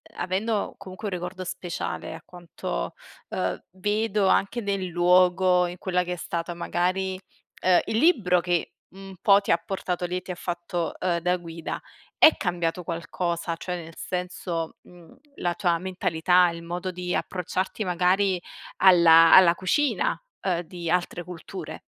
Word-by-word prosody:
avendo 200 +4 -1
comunque 195 +2 -8
un 200 - -3
ricordo 180 +1 -5
speciale 180 -1 -5
a - - -11
quanto, 170 - -5 0.4
uhm, - - -2
vedo 210 +1 0
anche 200 +5 +2
nel 200 -3 -2
luogo, 180 +1 +4
in 175 +1 -7
quella 180 0 0
che 180 0 -4
è - - -3
stata 170 0 -4
magari 185 +2 -1 0.4
ehm, 185 -1 +4
il 220 - -1
libro 225 - +4
che 175 -1 -1 0.2
un 195 0 -11
po' 200 -1 +6
ti 200 - -2
ha 170 - +5
portato 180 0 -3
lì 180 +1 -2
e - - -4
ti 180 - -7
ha - - -4
fatto, 175 -1 -3
uhm, 175 -2 0
da 180 +1 +1
guida, 165 -2 -6 0.4
è 315 - +7
cambiato 175 -1 -2
qualcosa? 170 0 -3
Cioè, 180 +2 -4
nel 165 0 -12
senso, 180 -2 -4
mhmm, 175 -2 -17 0.2
la 175 -1 -1
tua 175 -1 +1
mentalità, 180 -1 +2
il 170 0 -7
modo 175 +2 -4
di 180 0 -3
approcciarti 185 +3 -2
magari 185 +1 +2 0.4
alla 170 -3 +7
alla 175 -2 +8
cucina, 275 - 0 0.2
uhm, 180 -3 0
di 170 0 -6
altre 175 0 0
culture? 175 -2 -8
180 Hz, 155 wpm, -25 LUFS, 175-190 Hz, 0.4 s, alla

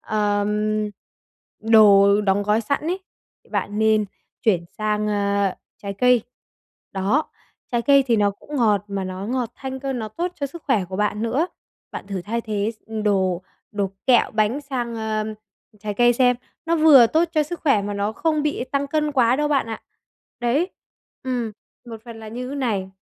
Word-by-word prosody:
ờm, 210 0 0 0.7
đồ 205 -2 +6
đóng 200 0 +1
gói 210 +2 +2
sẵn 280 +6 -1
ấy, 360 +4 -2 0.5
bạn 205 +1 -2
nên 220 -1 +3 0.4
chuyển 180 -6 +2
sang, 210 0 0
ờ, 200 -2 +1 0.3
trái 200 0 -4
cây. 250 +2 +4 0.7
Đó, 200 +11 0 0.4
trái 235 -1 +1
cây 280 +1 +5
thì 235 - +3
nó 205 -1 +3
cũng 285 +9 -8
ngọt 210 -5 +2
mà 195 -1 -3
nó 185 +2 -5
ngọt 245 -1 -2
thanh 265 -1 -6
cơ, 275 0 -2
nó 225 -4 -4
tốt 350 - -3
cho 285 -3 -2
sức 325 +4 -11
khỏe 225 -10 +2
của 185 +1 -6
bạn 210 +1 0
nữa. 260 +9 +1 0.5
Bạn - - -7
thử 195 -3 -4
thay 230 +5 -2
thế 215 -1 -2
s - - -44 0.2
đồ 190 -3 +1 0.3
đồ 200 -2 -1 0.2
kẹo 250 -2 +4
bánh 220 +5 +1
sang, 255 -5 -4
ờ, 220 -1 -2 0.6
trái 210 0 -4
cây 240 +3 +5
xem. 250 0 +3 0.3
Nó 335 +1 +2
vừa 295 -7 +8
tốt 320 +7 +2
cho 310 - +3
sức 345 +4 -6
khỏe 270 -10 +3
mà 205 0 -3
nó 200 +2 -1
không 310 +3 0
bị 295 -4 -1
tăng 280 0 0
cân 300 0 0
quá 250 -2 +3
đâu 295 +1 0
bạn 275 -5 +1
ạ. 225 -1 -6 0.6
Đấy, 280 +10 +1 0.5
ừm, 245 -4 -2 0.3
một 225 -2 -9
phần 230 -2 -10
là 220 - -8
như 250 +3 -5
thế 280 - -5
này. 205 -8 -1
225 Hz, 185 wpm, -22 LUFS, 205-265 Hz, 0.7 s, vừa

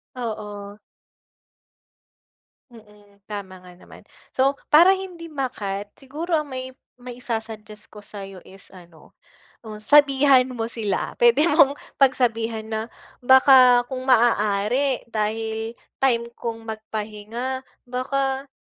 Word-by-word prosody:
Oo. 210 -4 -6 1.9
Mm. 210 -3 -19
Tama 195 -3 -7
nga 180 0 -14
naman. 175 - -16 0.3
So 270 +2 +1 0.2
para 345 +6 +7
hindi 360 -3 -8
ma-cut 205 -9 -4
siguro 310 +5 -2
ang 300 - -6
may 260 0 -6 0.2
mai-su-suggest 225 -4 -7
ko 210 -1 -13
sa'yo 195 -2 -9
is 190 0 -16
ano, 175 -4 -18 0.4
oh, 215 -2 -9
sabihan 275 +2 +4
mo 225 - -2
sila 220 -4 -3
puwede 240 +5 +5
mong 285 -2 +4 0.2
pagsabihan 230 -4 +1
na 220 0 -4 0.4
baka 255 -1 +6
kung 260 0 -5
maaari 235 +2 +2
dahil 225 +1 -3 0.2
time 240 -3 +2
kong 225 -1 -6
magpahinga 220 +3 -5 0.2
baka, 270 +2 -2
235 Hz, 105 wpm, -23 LUFS, 210-265 Hz, 1.9 s, para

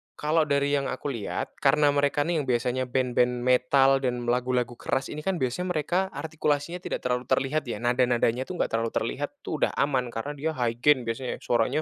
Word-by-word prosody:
kalau 155 +1 +1
dari 140 -1 +1
yang 140 - -2
aku 145 - -3
lihat, 115 -6 -4
karena 145 +1 +4
mereka 145 0 +2
nih 170 +2 0
yang 145 - -1
biasanya 125 +1 0
band-band 125 -1 +1
metal 135 +2 +4
dan 125 -2 -2
lagu-lagu 125 -1 0
keras 130 - -2
ini, 150 0 -7
kan 185 -5 -1
biasanya 180 +9 -1
mereka 175 +5 0
artikulasinya 160 +1 -2
tidak 180 - -4
terlalu 125 0 -1
terlihat 145 +4 0
ya, 115 -2 -5
nada-nadanya 120 0 +2
tuh - - -6
enggak - - 0
terlalu 115 0 -1
terlihat - - -3
tuh - - 0
udah - - -4
aman, 130 -4 0
karena 145 +6 -4
dia 160 +3 -1
high 120 -3 -1
gen 125 -3 +3
biasanya, 125 +2 -4
suaranya 120 +6 +1
130 Hz, 195 wpm, -26 LUFS, 125-150 Hz, -, karena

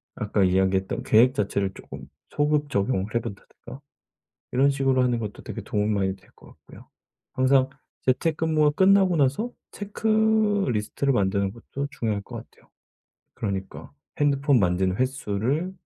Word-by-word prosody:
아까 105 -1 0
이야기했던 95 +1 +1
계획 120 +4 +5
자체를 100 -4 -1
쪼끔 65 0 -11 0.2
소급 150 0 0
적용을 100 -3 -1
해 - - +4
본다든가 115 +5 -10 0.7
이런 135 +3 +3
식으로 135 -2 +1
하는 125 -1 +1
것도 105 -2 -6
되게 - - -7
도움이 105 0 -1
많이 95 -3 0
될 95 +1 -24
것 - - -20
같고요. - - -17 0.4
항상 130 0 +3 0.3
재택근무가 155 +3 +1
끝나고 190 +2 +4
나서 145 - +1 0.2
체크 215 0 +1
리스트를 125 +4 -1
만드는 100 -2 0
것도 140 +5 -6
중요할 105 -5 -2
것 - - -10
같아요. - - -13 0.6
그러니까 95 -2 -5 0.3
핸드폰 140 -1 +3
만진 90 +1 +1
횟수를 130 - -1
130 Hz, 330 characters per minute, -25 LUFS, 100-145 Hz, 0.7 s, 계획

